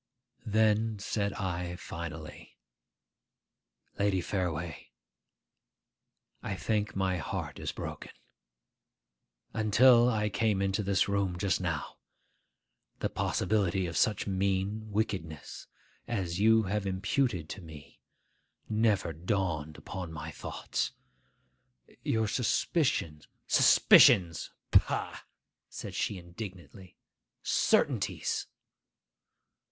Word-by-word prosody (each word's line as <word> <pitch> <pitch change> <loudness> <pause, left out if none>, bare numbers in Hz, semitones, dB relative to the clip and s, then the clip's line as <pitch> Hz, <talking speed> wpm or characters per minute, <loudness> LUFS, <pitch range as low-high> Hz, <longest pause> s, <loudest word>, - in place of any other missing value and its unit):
Then 110 0 +2
said 100 0 -1
I 90 -3 -3
finally, 80 -3 -8 1.4
'Lady 100 -2 +2
Fareway, 85 -4 -3 1.5
I 95 - -3
think 105 +1 -1
my 95 -1 0
heart 75 - -5
is - - -3
broken. - - -7 1.4
Until 120 +3 +5
I 105 -3 +1
came 105 -1 +1
into 100 +1 0
this 100 -1 +1
room 100 -3 0
just 95 -1 0
now, 80 -5 -3 1.0
the - - -2
possibility 95 -3 0
of 85 -1 -5
such 105 - +2
mean 100 +2 -1
wickedness 95 - -3 0.4
as 95 -6 -2
you 110 +1 +5
have 100 0 -2
imputed 95 - 0
to 100 - -6
me 75 -4 -13 0.7
never 105 -6 +1
dawned 80 -3 -2
upon 90 -3 -6
my 80 -2 -6
thoughts. - - -3 1.1
Your 110 -1 0
suspicions—' 115 - 0 0.2
'Suspicions! 85 -4 +6 0.2
Pah!' - - +2 0.5
said - - -7
she 100 - -1
indignantly. 90 0 -10 0.5
'Certainties. - - +1
95 Hz, 90 wpm, -30 LUFS, 85-105 Hz, 1.5 s, Suspicions